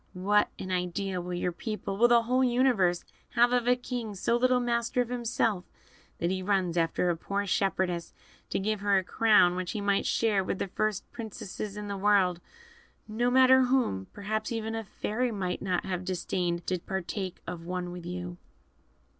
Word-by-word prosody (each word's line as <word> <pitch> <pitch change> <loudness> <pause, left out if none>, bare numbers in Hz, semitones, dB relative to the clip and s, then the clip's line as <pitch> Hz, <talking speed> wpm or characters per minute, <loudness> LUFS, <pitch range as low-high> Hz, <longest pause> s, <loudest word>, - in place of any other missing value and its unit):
What 205 +3 +3
an 185 - -6
idea 180 +1 -2
will 180 0 -4
your 175 0 -1
people 210 +1 -4
will 235 +4 +5
the 240 -1 +5
whole 255 +3 +2
universe 240 -8 +2 0.3
have 240 0 +5
of 245 -1 +1
a 250 - +5
king 245 -4 -5
so 235 +5 +1
little 250 +1 +3
master 235 0 0
of 245 -1 +1
himself 230 -5 0 0.5
that 170 +1 -1
he 190 0 -1
runs 185 -3 0
after 170 +1 +1
a - - -1
poor 200 +4 -3
shepherdess, 185 -3 0 0.4
to - - -1
give 210 +2 -1
her 200 0 +3
a 190 - +1
crown 210 -3 +4
which 180 -1 -3
he 215 - -3
might 200 -1 +1
share 210 -4 +2
with 185 - -2
the - - -2
first 215 +1 -1
princesses 215 -2 -6
in 210 0 -5
the 200 -1 -3
world 190 -3 +3 0.7
no 230 +3 0
matter 260 0 +6
whom: 245 - +1
perhaps 215 +2 -3
even 225 -1 -3
a 225 0 -3
fairy 235 +4 -2
might 185 -4 -3
not 185 -2 -1
have 185 -1 -3
disdained 175 -1 -2
to 185 -1 -1
partake 190 0 -4
of 170 -1 -7
one 180 -1 -3
with 175 -1 -8
you." 180 0 -5
200 Hz, 185 wpm, -29 LUFS, 180-230 Hz, 0.7 s, matter